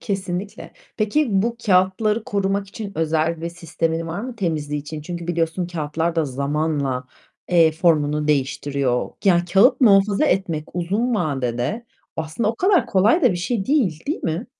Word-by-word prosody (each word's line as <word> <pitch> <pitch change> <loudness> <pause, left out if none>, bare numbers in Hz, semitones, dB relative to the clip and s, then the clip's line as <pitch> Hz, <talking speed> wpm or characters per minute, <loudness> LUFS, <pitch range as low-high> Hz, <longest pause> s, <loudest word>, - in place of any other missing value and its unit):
Kesinlikle. 195 -1 -4 0.2
Peki 235 +6 +1
bu 235 0 -1
kâğıtları 200 +4 +2
korumak 200 0 -1
için 205 -1 -7
özel 160 +1 0
bir 170 - -3
sistemin 165 -1 -3
var 165 +5 -4
mı 250 0 -6
temizliği 150 -6 -2
için? 150 +1 -7
Çünkü 170 +2 -6
biliyorsun 170 +1 -1
kâğıtlar 165 0 -2
da 160 - +2
zamanla, 140 -1 -1 0.5
eee, 165 -3 +5
formunu 150 -2 +1
değiştiriyor. 140 -2 0
Yani 175 -3 +4
kâğıt 195 +11 +4
muhafaza 205 +2 +4
etmek 170 - 0
uzun 205 +8 0
vadede 140 - -2 0.3
aslında 160 +8 -2
o - - -7
kadar 375 -2 +3
kolay 215 - +3
da 250 - +5
bir - - -3
şey 195 +3 -2
değil, 220 - 0
değil 305 - -2
mi? 165 +7 -2
175 Hz, 150 wpm, -21 LUFS, 155-205 Hz, 0.5 s, eee